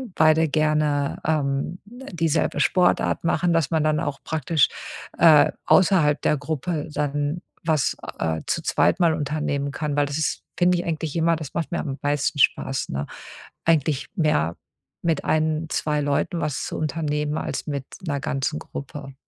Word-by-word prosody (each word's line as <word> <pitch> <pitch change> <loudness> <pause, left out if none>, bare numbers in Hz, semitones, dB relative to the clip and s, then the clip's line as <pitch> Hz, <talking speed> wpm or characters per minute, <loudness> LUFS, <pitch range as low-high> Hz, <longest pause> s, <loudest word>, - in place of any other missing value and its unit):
beide 160 0 +4
gerne, 150 -2 +1
ähm, 150 +2 0
dieselbe 180 - -2
Sportart 180 -1 +2
machen, 170 +1 +1
dass 165 -5 +1
man 160 -2 +2
dann 155 0 +2
auch 140 -1 -3
praktisch, 160 -2 +2 0.5
äh, 155 -3 +7
außerhalb 170 -6 +4
der 150 - +2
Gruppe 155 +2 -3
dann 145 +3 -1 0.2
was, 155 -4 +1 0.2
äh, 80 -1 -1
zu - - 0
zweit - - +2
mal 170 -3 +4
unternehmen 145 -1 -2
kann. 150 0 -3
Weil 145 0 +3
das 145 +1 -3
ist 155 - -1 0.2
finde 180 0 +3
ich, 175 - -3
eigentlich 160 -2 -3
immer 165 0 +3
das 155 -3 -8
macht 165 -2 -2
mir 170 - -1
am 135 -3 -4
meisten 145 +1 0
Spaß, 135 0 +2
ne? 70 +1 -3 0.6
Eigentlich 155 -3 +2
mehr 150 - +1 0.5
mit 165 -3 0
1, 155 0 +1
2 150 -1 0
Leuten 145 +4 0
was 150 -4 -2
zu - - -5
unternehmen 150 -1 -1
als - - -4
mit 140 -3 -3 0.2
'ner 140 -3 -1
ganzen 135 0 -1
Gruppe. 140 0 -8
155 Hz, 160 wpm, -23 LUFS, 145-165 Hz, 0.6 s, äh